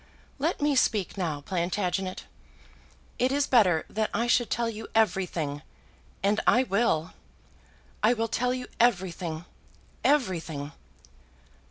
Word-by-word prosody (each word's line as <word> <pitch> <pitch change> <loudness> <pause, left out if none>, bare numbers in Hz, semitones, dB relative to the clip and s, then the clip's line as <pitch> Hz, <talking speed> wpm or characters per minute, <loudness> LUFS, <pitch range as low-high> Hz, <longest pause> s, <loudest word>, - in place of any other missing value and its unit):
"Let 315 +1 -1
me 295 -1 +3
speak 215 -7 +1
now, 165 -7 -2
Plantagenet, 185 +2 -2 1.0
It 255 +1 +2
is 285 0 +2
better 185 - +4
that 220 0 -1
I 235 - +1
should 240 -1 +2
tell 235 -1 0
you 220 -1 -6
everything; 175 -9 0 0.6
and 205 +2 +2
I 250 - +5
will. 200 -8 0 0.9
I 220 +3 +5
will 230 -1 -1
tell 250 +3 0
you 255 0 -3
everything; 175 -7 0 0.6
everything! 170 - 0
210 Hz, 120 wpm, -27 LUFS, 175-240 Hz, 1.0 s, I